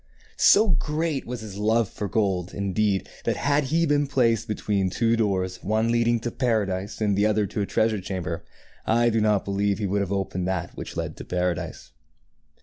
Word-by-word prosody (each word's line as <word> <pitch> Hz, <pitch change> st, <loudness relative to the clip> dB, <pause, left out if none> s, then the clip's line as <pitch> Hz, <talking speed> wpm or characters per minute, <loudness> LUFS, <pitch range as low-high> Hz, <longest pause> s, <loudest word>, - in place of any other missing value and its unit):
So 215 Hz, +1 st, +6 dB
great 155 Hz, -2 st, -1 dB
was 125 Hz, -1 st, -5 dB
his 105 Hz, -3 st, -8 dB
love 110 Hz, +1 st, +2 dB
for 105 Hz, -, -5 dB
gold, 95 Hz, -3 st, -1 dB
indeed, 100 Hz, 0 st, 0 dB, 0.2 s
that, -, -, 0 dB
had 145 Hz, 0 st, +1 dB
he 165 Hz, +5 st, +2 dB
been 145 Hz, -2 st, +2 dB
placed 115 Hz, -5 st, +2 dB
between 100 Hz, -3 st, 0 dB
two 115 Hz, +4 st, +1 dB
doors, 95 Hz, -4 st, -1 dB
one 110 Hz, +3 st, +1 dB
leading 120 Hz, 0 st, +2 dB
to 120 Hz, -, -3 dB
paradise 105 Hz, -5 st, -1 dB
and 105 Hz, -2 st, +2 dB
the 100 Hz, +2 st, +3 dB
other 105 Hz, -1 st, +2 dB
to 105 Hz, +2 st, -3 dB
a 100 Hz, -, -1 dB
treasure 110 Hz, -2 st, +1 dB
chamber, 90 Hz, -3 st, -4 dB, 0.4 s
I 120 Hz, +1 st, +3 dB
do 110 Hz, 0 st, +1 dB
not 105 Hz, -2 st, +2 dB
believe 100 Hz, 0 st, 0 dB
he 105 Hz, -, -2 dB
would 100 Hz, +1 st, 0 dB
have 100 Hz, -1 st, -3 dB
opened 95 Hz, -2 st, -2 dB
that 90 Hz, -2 st, -3 dB
which -, -, -7 dB
led -, -, -4 dB
to -, -, -7 dB
paradise. 90 Hz, -1 st, -3 dB
105 Hz, 190 wpm, -25 LUFS, 95-115 Hz, 0.4 s, So